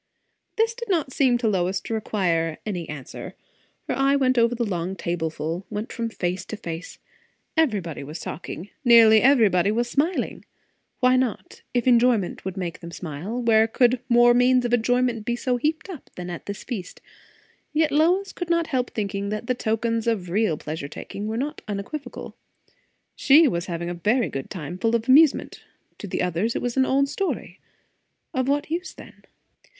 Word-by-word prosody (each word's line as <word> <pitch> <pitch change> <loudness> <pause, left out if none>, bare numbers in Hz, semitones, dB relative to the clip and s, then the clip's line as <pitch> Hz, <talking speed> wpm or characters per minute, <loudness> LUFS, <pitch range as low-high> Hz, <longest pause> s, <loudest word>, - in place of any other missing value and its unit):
This 450 +1 +2
did 470 -1 -8
not 320 -8 0
seem 255 -4 +3
to 240 -1 -1
Lois 190 -2 +1
to - - -5
require 170 -7 0
any 180 -6 -4
answer. 140 -4 -8 0.5
Her - - -1
eye 275 +1 +3
went 255 -3 +2
over 235 +1 +3
the 235 0 -1
long 185 -2 -3
tableful; 165 0 -3
went 215 +1 -5
from 230 -2 -3
face 180 -3 -3
to 215 - -6
face. 165 -2 -7 0.6
Everybody 205 - 0
was 150 +4 -7
talking, 175 +3 -7
nearly 230 -3 +7
everybody 210 -8 +4
was 235 +2 0
smiling. 310 +8 -1 0.6
Why 255 0 +5
not? 255 -4 -2
If 245 - +1
enjoyment 240 -6 +3
would 190 0 -5
make 175 -3 -4
them 170 - -9
smile, 175 +8 -5
where 220 -1 +4
could 245 +2 +3
more 240 0 +6
means 250 +1 +4
of 240 - -1
enjoyment 245 -1 +1
be 240 +2 -1 0.3
heaped 315 +4 -1
up, 360 -8 -9
than 180 0 -6
at 175 - -8
this 200 -1 -6
feast? 205 -8 -6 0.7
Yet 310 0 +2
Lois 355 +7 +2
could 350 -2 -5
not 335 -1 +2
help 250 -1 +1
thinking 200 -1 -3
that 215 +2 -4
the 250 - +1
tokens 230 -1 -1
of 190 -7 -1
real 205 -5 +1
pleasure 155 -1 -5
taking 200 +7 -7
were 220 +1 -2
not 290 +5 -3
unequivocal. 210 +9 -6 0.8
She 300 +3 +6
was 175 -7 -2
having 170 -1 -4
a 175 - -3
very 215 +8 +1
good 135 -1 -5
time; 175 -1 -6
full 225 +2 +2
of 230 0 -2
amusement; 290 +3 +4 0.4
to 205 - -6
the 180 - -2
others 180 +6 -1
it - - -1
was 245 -1 -2
an 265 -1 +3
old 275 +1 +2
story. 380 +7 -3 0.7
Of 260 -2 0
what 290 +2 0
use, 350 +3 -3
then? - - -14
225 Hz, 175 wpm, -24 LUFS, 180-255 Hz, 0.8 s, nearly